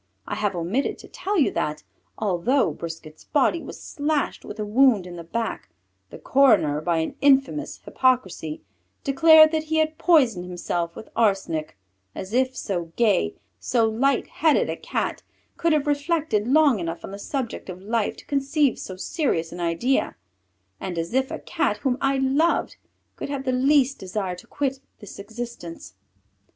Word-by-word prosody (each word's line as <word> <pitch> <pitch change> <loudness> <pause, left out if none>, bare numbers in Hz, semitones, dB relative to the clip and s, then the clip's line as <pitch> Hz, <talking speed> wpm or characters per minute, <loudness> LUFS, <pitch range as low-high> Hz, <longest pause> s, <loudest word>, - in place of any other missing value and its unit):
I - - -4
have 205 -3 -1
omitted 180 +11 -1
to - - -13
tell 405 +1 -3
you 295 - +3
that, 150 0 -2 0.3
although 215 +8 +1
Brisquet's 160 -2 -9
body 310 +3 +2
was - - -9
slashed 295 -1 -2
with 215 - -9
a 210 - -1
wound 225 -2 +4
in 180 -1 -8
the 170 - -7
back, 225 +7 -4 0.4
the - - -10
coroner, 215 - +3
by 170 +1 0
an 160 - -1
infamous 280 +1 +2
hypocrisy, 195 - 0 0.4
declared 310 +2 +7
that 315 -1 -1
he 315 +1 -1
had 315 0 0
poisoned 255 - +3
himself 175 -1 -3
with - - -10
arsenic, 195 - 0 0.4
as 190 +3 -7
if 255 +1 +1
so 180 -4 -2
gay, 205 - +2 0.2
so 230 -3 +2
light 250 +4 +1
headed 315 -1 +2
a - - -3
Cat - - -3 0.3
could 335 - +1
have 305 -2 +2
reflected 290 -6 0
long 285 -4 +4
enough 165 -1 -4
on - - -9
the 200 - -7
subject 250 -2 -4
of 185 0 -7
life 220 +1 -1
to - - -13
conceive 280 -1 +1
so 185 - -7
serious 185 - -1
an 175 - -8
idea, 175 +10 0 0.6
and 185 -3 -5
as 165 +5 -3
if 265 0 +1
a - - -4
Cat 315 -12 -1
whom 260 -2 -1
I 275 0 +2
loved 275 +6 +1 0.4
could - - -5
have 280 -2 -3
the 255 - +1
least 270 +1 +3
desire 190 0 -3
to - - -14
quit 270 -2 -2 0.2
this 205 -2 -11
existence! 200 - -8
240 Hz, 165 wpm, -24 LUFS, 180-280 Hz, 0.6 s, declared